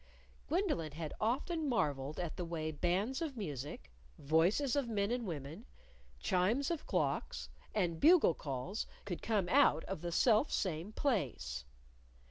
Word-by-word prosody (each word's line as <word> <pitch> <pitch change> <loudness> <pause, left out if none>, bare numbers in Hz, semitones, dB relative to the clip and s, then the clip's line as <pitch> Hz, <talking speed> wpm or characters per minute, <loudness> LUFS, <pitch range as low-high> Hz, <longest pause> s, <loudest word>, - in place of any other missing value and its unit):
Gwendolyn 305 - 0
had 155 0 -5
often 290 +7 0
marveled 145 - 0
at 175 -3 -3
the 180 - -3
way 160 -2 -3
bands 185 - 0
of 295 -6 -3
music, 145 - -5 0.3
voices 175 - +2
of 280 -4 +1
men 205 -1 0
and 240 -3 -1
women, 160 - -6 0.5
chimes 205 - +1
of 335 - -3
clocks, - - -1 0.3
and 175 -6 +1
bugle 325 - +6
calls 145 - -4 0.2
could 180 -4 -4
come 210 -5 +1
out 165 - +5
of 190 -4 -5
the 175 0 -3
self 225 - +4
same 180 +1 -1
place. 125 - -1
180 Hz, 140 wpm, -35 LUFS, 155-240 Hz, 0.5 s, bugle